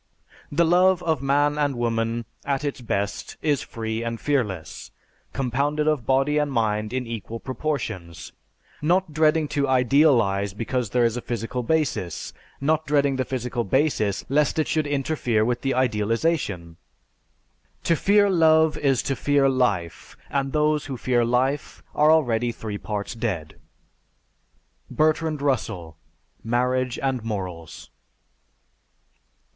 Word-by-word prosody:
"The 170 +4 +3
love 180 +2 +4
of 160 -5 0
man 145 +2 +2
and 145 -2 +1
woman 115 0 -1 0.2
at 140 0 -1
its 140 -3 -3
best 100 -3 -3
is 145 -3 +1
free 110 0 -4
and 115 0 -4
fearless, 105 - -2 0.4
compounded 140 +4 -1
of 150 -6 0
body 135 +3 +2
and 145 -1 0
mind 110 -3 0
in 130 0 -2
equal 115 0 -6
proportions, 115 - -4 0.5
not 175 +1 +1
dreading 155 0 +3
to 140 -1 0
idealize 125 -7 +3
because 120 +1 -2
there 120 +2 +2
is 115 +1 0
a - - -3
physical 120 +2 -3
basis, 125 - -1 0.3
not 155 +3 0
dreading 140 -2 +2
the 130 - +1
physical 125 -1 -3
basis 110 -4 0
lest 145 +3 +1
it 155 - +1
should 155 -2 0
interfere 135 -6 0
with 120 +1 -1
the 135 -1 0
idealization. 115 - 0 1.1
To 165 - +2
fear 205 +5 +4
love 160 -4 +4
is 135 -3 +2
to 135 - -1
fear 140 +2 +2
life 105 -11 -1
and 135 -1 -1
those 150 0 +1
who 135 -3 -5
fear 120 0 +1
life 130 +5 -1
are 150 +1 +4
already 120 -7 +2
three 110 -3 -6
parts 105 +2 -4
dead." 90 - -4 1.3
(_Bertrand 155 -1 +1
Russell: 110 - -2 0.5
"Marriage 125 +2 0
and 130 -3 -2
Morals." 95 -7 -6
130 Hz, 130 wpm, -24 LUFS, 115-150 Hz, 1.3 s, love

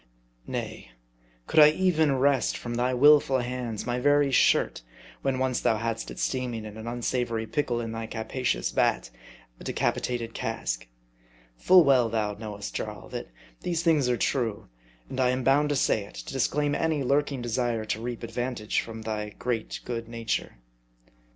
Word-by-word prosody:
Nay: - - -5 0.5
could - - +2
I 150 0 +10
even 160 -4 +2
wrest 135 -2 +2
from 120 - -5
thy 125 +2 +1
willful 140 +1 +5
hands 125 -3 -3
my 120 0 -1
very 145 +1 +3
shirt, 130 - +3 0.4
when 135 -1 0
once 130 -1 0
thou 110 - +2
hadst 115 0 -3
it - - -9
steaming 125 -4 -2
in 105 -1 -8
an 110 +1 -8
unsavory 120 -1 -1
pickle 120 -2 -1
in 115 -1 -4
thy 115 0 -5
capacious 110 - -2
vat, - - +1 0.5
a - - -11
decapitated 115 -2 -1
cask? - - -3 0.7
Full 180 - +6
well 130 -5 +4
thou 105 -2 -1
knowest, 105 -1 -7
Jarl, - - -5
that - - -5 0.3
these 170 -1 -2
things 150 -7 +3
are 120 - +2
true; 115 - -1 0.4
and 130 - -6
I 125 -1 +4
am 125 0 0
bound 140 +3 +3
to 145 - +1
say 110 -5 +2
it, - - -15
to - - -7
disclaim 145 +2 +1
any 155 -2 0
lurking 140 -1 +1
desire 120 -2 -1
to 110 +1 -2
reap 120 0 -5
ad 115 - -6
vantage 120 -2 -1
from 115 -1 -8
thy 105 -1 -3
great 115 +1 -3
good 115 -2 -4
nature. 115 -1 -2
120 Hz, 170 wpm, -27 LUFS, 115-135 Hz, 0.7 s, I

